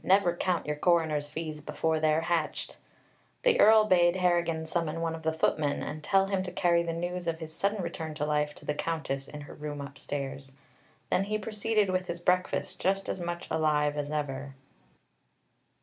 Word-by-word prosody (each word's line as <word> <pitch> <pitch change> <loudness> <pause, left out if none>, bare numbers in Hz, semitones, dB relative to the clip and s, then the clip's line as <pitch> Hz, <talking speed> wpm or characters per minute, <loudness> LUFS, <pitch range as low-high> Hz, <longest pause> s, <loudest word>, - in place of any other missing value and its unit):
Never 185 -2 +4
count 180 -1 0
your 150 0 -2
coroner's 155 -3 +2
fees 155 0 -5
before 155 +1 0
they're 155 0 +3
hatched!" 165 -2 -1 0.7
The - - +4
Earl 220 0 +7
bade 175 -3 +4
Harrigan 170 -3 +1
summon 165 -1 -2
one 165 -1 -1
of 165 - -6
the 160 0 +1
footmen 155 -2 0
and 155 0 -5
tell 195 +2 +3
him 195 -1 0
to 185 -1 -5
carry 175 -1 +3
the 170 0 -2
news 175 +1 -3
of 165 -1 0
his 160 -1 -8
sudden 200 +3 0
return 160 -2 -5
to 150 -1 -1
life 150 0 0
to - - -14
the 150 - 0
Countess 150 -4 -3
in 150 - -8
her 145 - -10
room 150 -1 -6
upstairs. 140 -1 -6 0.6
Then 195 - +2
he 215 +1 -1
proceeded 215 -1 0
with 185 0 -1
his 170 - -4
breakfast, 180 +1 0
just 195 +1 +1
as - - -2
much 175 0 -4
alive 150 -2 +2
as 145 -1 -3
ever. 140 -2 -3
165 Hz, 185 wpm, -29 LUFS, 150-180 Hz, 0.7 s, Earl